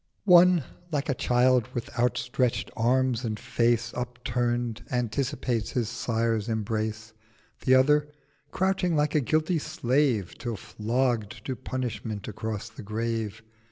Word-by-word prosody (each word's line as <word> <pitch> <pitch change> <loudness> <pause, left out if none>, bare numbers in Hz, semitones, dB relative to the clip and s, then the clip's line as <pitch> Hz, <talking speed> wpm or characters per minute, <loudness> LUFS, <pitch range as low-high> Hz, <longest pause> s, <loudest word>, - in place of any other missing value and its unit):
— - - -44
One, 180 -3 +7 0.3
like 150 0 -1
a - - +3
child 125 -1 +3
with 120 - -4
outstretcht 125 0 0
Arms 125 +1 +2
and 110 -2 -3
Face 120 0 +1
Upturn'd, 120 -1 -2
anticipates 125 -1 -1
his 120 -5 0
Sire's 115 -1 -1
Embrace; 110 0 -2 0.5
The 130 - +6
other 150 +3 +4 0.4
crouching 190 -2 +1
like 150 0 +1
a 150 - +3
guilty 155 +5 +1
Slave 125 - 0
Till 120 -3 -3
flogg'd 115 +1 -1
to 130 - -2
Punishment 120 -5 -4
across 110 +1 -4
the 115 - -11
Grave. 110 0 -3
120 Hz, 125 wpm, -27 LUFS, 115-130 Hz, 0.5 s, One